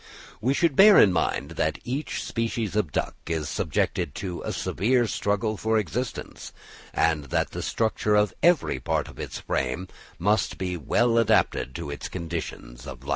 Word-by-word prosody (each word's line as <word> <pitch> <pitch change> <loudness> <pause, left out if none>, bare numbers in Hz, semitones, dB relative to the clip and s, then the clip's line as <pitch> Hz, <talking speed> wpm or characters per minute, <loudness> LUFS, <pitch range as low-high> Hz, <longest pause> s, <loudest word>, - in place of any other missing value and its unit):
We 130 +5 +2
should 165 -4 +2
bear 205 +4 +8
in 95 - +7
mind 80 -3 -1
that 80 -1 +1
each 135 +5 -3
species 115 -3 -2
of 100 -8 0
duck - - -1
is 80 -3 -2
subjected 85 -7 -1
to 90 -3 -5
a - - -3
severe 120 +5 +1
struggle 105 0 -1
for 110 +2 +1
existence, 115 +4 -4 0.4
and 80 -3 +1
that 65 - -1
the - - -5
structure 110 -1 0
of 105 -1 +3
every 170 -1 +3
part - - -1
of - - -13
its - - -5
frame 65 +8 -2 0.3
must 100 +2 +1
be 90 -1 -2
well 115 - +2
adapted 65 - +2
to 70 - -5
its 70 - -6
conditions 80 -8 -6
of - - -9
life. - - -9
100 Hz, 170 wpm, -26 LUFS, 80-115 Hz, 0.4 s, bear